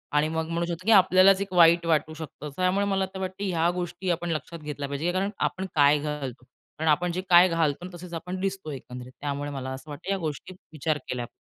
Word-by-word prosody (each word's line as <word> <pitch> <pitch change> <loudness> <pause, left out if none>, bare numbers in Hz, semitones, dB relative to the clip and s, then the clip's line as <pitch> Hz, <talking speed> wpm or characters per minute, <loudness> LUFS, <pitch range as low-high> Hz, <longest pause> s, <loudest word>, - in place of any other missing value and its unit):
आणि 150 +1 +3
मग 160 0 -2
म्हणू 170 +1 -1
शकतो 170 +1 -5
की 225 - +4
आपल्यालाच 190 0 +6
एक 195 -2 -4
वाईट 170 -1 +6
वाटू 155 -1 +1
शकतं. 155 -1 -8
त्यामुळे 185 +2 +1
मला 195 -1 +1
वाटतं 190 +1 -4
ह्या 170 -3 +1
गोष्टी 175 +1 -4
आपण 170 0 -2
लक्षात 165 +2 -4
घेतल्या 150 -2 -5
पाहिजे, 150 +5 -1
कारण 190 +2 0 0.2
आपण 190 +1 -6
काय 145 0 +5
घालतो. 145 -4 -5 0.3
कारण 160 +1 0
आपण 175 +4 +1
जे 180 +2 -2
काय 180 +1 +8
घालतो 165 0 0
तसेच 175 0 -10
आपण 180 +3 -5
दिसतो 190 -4 -3
एकंदरीत. 125 -2 -8
त्यामुळे 145 0 -3
मला 130 -1 -5
असं 130 +3 -10
वाटतं 160 +6 -5
या 195 - +1
गोष्टी 170 +1 -5 0.2
विचार 155 0 -1
केल्या 125 -1 -3
पाहिजे. - - -17
165 Hz, 215 wpm, -26 LUFS, 150-185 Hz, 0.3 s, काय